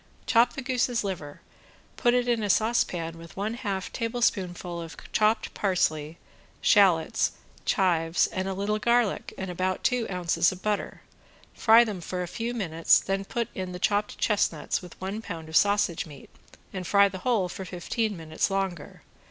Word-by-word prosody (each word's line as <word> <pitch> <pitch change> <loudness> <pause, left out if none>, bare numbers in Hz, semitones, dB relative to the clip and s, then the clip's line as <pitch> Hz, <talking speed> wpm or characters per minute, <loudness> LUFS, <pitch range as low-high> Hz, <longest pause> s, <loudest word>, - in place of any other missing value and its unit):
Chop 235 0 +4
the 270 - -6
goose's 245 -2 0
liver, 165 -7 -5 0.5
put 240 0 +2
it 245 0 +1
in 235 -2 +1
a 205 - -2
saucepan 180 -7 +1
with 165 +2 -13
one 210 +3 -2
half 200 -5 -4
tablespoonful 190 -7 -1
of 165 -1 -9
chopped 215 +1 +2
parsley, 160 -5 0 0.4
shallots, 195 -1 +3 0.3
chives, 170 -3 +2
and 185 0 -3
a 190 - -2
little 205 +2 -1
garlic 235 -2 +1
and 190 -1 -4
about 185 +1 -2
two 250 -2 +1
ounces 175 -2 +1
of 185 0 -10
butter, 210 -1 -2 0.5
fry 225 +1 +6
them 210 -6 -4
for 180 +1 -3
a - - -5
few 230 +6 -3
minutes, 165 -7 +3
then 195 0 -2
put 235 +3 -2
in 185 -1 -5
the - - -5
chopped 205 +3 0
chestnuts 195 -7 0
with 180 -2 -13
one 195 +4 -4
pound 165 -6 -7
of 160 - -6
sausage 200 -4 +3
meat, 145 -3 -13 0.4
and 185 -2 -5
fry 200 0 +5
the 190 -1 -7
whole 215 -3 +1
for 190 - -7
fifteen 195 +4 -2
minutes 160 +2 -1
longer. 195 -5 -3
195 Hz, 170 wpm, -27 LUFS, 175-220 Hz, 0.5 s, fry